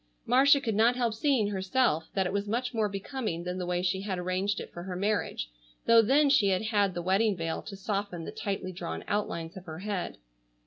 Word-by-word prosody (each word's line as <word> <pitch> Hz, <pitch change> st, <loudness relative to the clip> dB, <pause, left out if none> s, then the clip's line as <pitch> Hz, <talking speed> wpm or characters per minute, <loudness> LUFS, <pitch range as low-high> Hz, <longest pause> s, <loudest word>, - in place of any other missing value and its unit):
Marcia 275 Hz, +4 st, +6 dB
could 230 Hz, -5 st, -2 dB
not 225 Hz, +4 st, +4 dB
help 240 Hz, -3 st, 0 dB
seeing 225 Hz, -3 st, +2 dB
herself 190 Hz, -4 st, +1 dB
that 190 Hz, -1 st, +2 dB
it 180 Hz, -, -2 dB
was 200 Hz, 0 st, -1 dB
much 245 Hz, +4 st, -1 dB
more 220 Hz, -2 st, +1 dB
becoming 200 Hz, -3 st, -4 dB
than 180 Hz, +1 st, -4 dB
the 180 Hz, -, -3 dB
way 180 Hz, 0 st, 0 dB
she 190 Hz, +1 st, 0 dB
had 195 Hz, -2 st, -3 dB
arranged 185 Hz, +3 st, -1 dB
it -, -, -8 dB
for 175 Hz, -, -7 dB
her 180 Hz, 0 st, -5 dB
marriage, 185 Hz, -, -1 dB, 0.3 s
though 230 Hz, 0 st, +7 dB
then 275 Hz, +7 st, +4 dB
she 275 Hz, -8 st, +4 dB
had 190 Hz, +1 st, +1 dB
had 205 Hz, -4 st, +1 dB
the 175 Hz, -, -3 dB
wedding 195 Hz, +2 st, +2 dB
veil 165 Hz, -1 st, -2 dB
to 200 Hz, -, -8 dB
soften 195 Hz, -3 st, -3 dB
the -, -, -5 dB
tightly 195 Hz, -2 st, -3 dB
drawn 80 Hz, -, -5 dB
outlines 170 Hz, -5 st, -2 dB
of 190 Hz, -1 st, -9 dB
her 160 Hz, -2 st, -7 dB
head. 195 Hz, 0 st, -4 dB
200 Hz, 220 wpm, -29 LUFS, 180-225 Hz, 0.3 s, though